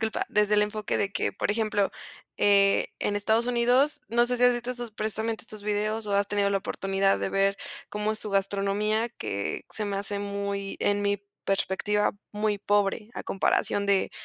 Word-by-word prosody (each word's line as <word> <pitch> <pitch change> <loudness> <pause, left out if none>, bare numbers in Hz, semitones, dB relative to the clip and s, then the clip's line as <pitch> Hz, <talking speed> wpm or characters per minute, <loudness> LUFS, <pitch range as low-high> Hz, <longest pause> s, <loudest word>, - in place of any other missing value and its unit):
disculpa, 220 -1 -1
desde 210 0 +3
el 210 - +5
enfoque 210 0 -2
de 200 0 -1
que, - - -1
por - - -1
ejemplo, 210 -2 +1 0.5
eh, 200 -1 +4
en 205 - 0
Estados 220 +3 +2
Unidos, 245 +5 +3
no 240 +1 +3
sé 250 0 0
si 245 - -1
has 245 - +7
visto 240 +1 -3
estos, 240 -2 -5
precisamente 220 +1 -3
estos 215 -2 -11
videos, 210 +1 -1
o 200 - 0
has 200 0 +2
tenido 200 -1 +1
la 200 - +2
oportunidad 195 0 0
de - - -1
ver 195 0 +2 0.3
cómo 210 +1 -1
es 215 - -6
su 210 - -6
gastronomía, 200 +3 +1
que 100 - -4
se 215 - -4
me 200 -1 -2
hace 200 +1 -3
muy, 200 -1 -3
en 205 0 +1
mi 200 0 0 0.2
perspectiva, 205 +2 +1 0.2
muy 210 -1 0
pobre, 205 +1 +1
a - - -5
comparación 200 +1 +1
de 200 -1 +2
205 Hz, 190 wpm, -27 LUFS, 200-220 Hz, 0.5 s, has